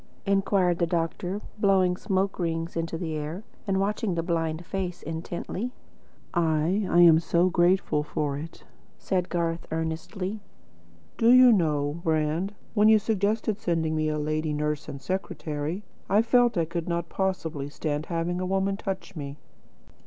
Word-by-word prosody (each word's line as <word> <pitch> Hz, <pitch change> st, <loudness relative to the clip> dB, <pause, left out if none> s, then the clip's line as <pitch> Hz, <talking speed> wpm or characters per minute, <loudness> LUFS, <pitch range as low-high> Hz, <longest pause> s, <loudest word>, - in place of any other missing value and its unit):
inquired 195 Hz, -3 st, +2 dB
the 170 Hz, -, +2 dB
doctor, 175 Hz, +4 st, -2 dB, 0.2 s
blowing 190 Hz, -3 st, +3 dB
smoke 195 Hz, 0 st, -1 dB
rings 165 Hz, -1 st, -2 dB
into 165 Hz, 0 st, -2 dB
the 160 Hz, -2 st, -3 dB
air, 155 Hz, +6 st, -4 dB, 0.2 s
and 190 Hz, -1 st, +1 dB
watching 205 Hz, -1 st, 0 dB
the 165 Hz, -, -1 dB
blind 165 Hz, -1 st, -1 dB
face 185 Hz, -2 st, -4 dB
intently. 170 Hz, +7 st, -4 dB, 0.6 s
"Ah, 160 Hz, -3 st, +2 dB
I 185 Hz, -1 st, +3 dB
am 165 Hz, -2 st, +8 dB
so 170 Hz, +2 st, +2 dB
grateful 175 Hz, -3 st, +3 dB
for 150 Hz, -1 st, -2 dB
it," 155 Hz, +4 st, -8 dB, 0.3 s
said 185 Hz, -2 st, -1 dB
Garth 170 Hz, -1 st, -1 dB
earnestly. 165 Hz, +6 st, -3 dB, 0.8 s
"Do 230 Hz, -, +5 dB
you 255 Hz, 0 st, +8 dB
know, 155 Hz, -5 st, +1 dB
Brand, 160 Hz, +5 st, 0 dB, 0.2 s
when 210 Hz, 0 st, +5 dB
you 220 Hz, -, +7 dB
suggested 215 Hz, 0 st, 0 dB
sending 165 Hz, -4 st, 0 dB
me 155 Hz, 0 st, +1 dB
a 150 Hz, -, -1 dB
lady 155 Hz, +1 st, -1 dB
nurse 150 Hz, 0 st, -2 dB
and 140 Hz, -, -6 dB
secretary, 160 Hz, 0 st, -3 dB, 0.3 s
I 210 Hz, +3 st, +4 dB
felt 240 Hz, -2 st, +3 dB
I 165 Hz, -, +2 dB
could 170 Hz, +1 st, -4 dB
not 170 Hz, 0 st, -1 dB
possibly 160 Hz, -7 st, -2 dB
stand 150 Hz, 0 st, -3 dB
having 175 Hz, +1 st, -1 dB
a -, -, -1 dB
woman 195 Hz, +1 st, 0 dB
touch 195 Hz, -1 st, -5 dB
me." 140 Hz, -2 st, -6 dB
170 Hz, 155 wpm, -27 LUFS, 160-195 Hz, 0.8 s, am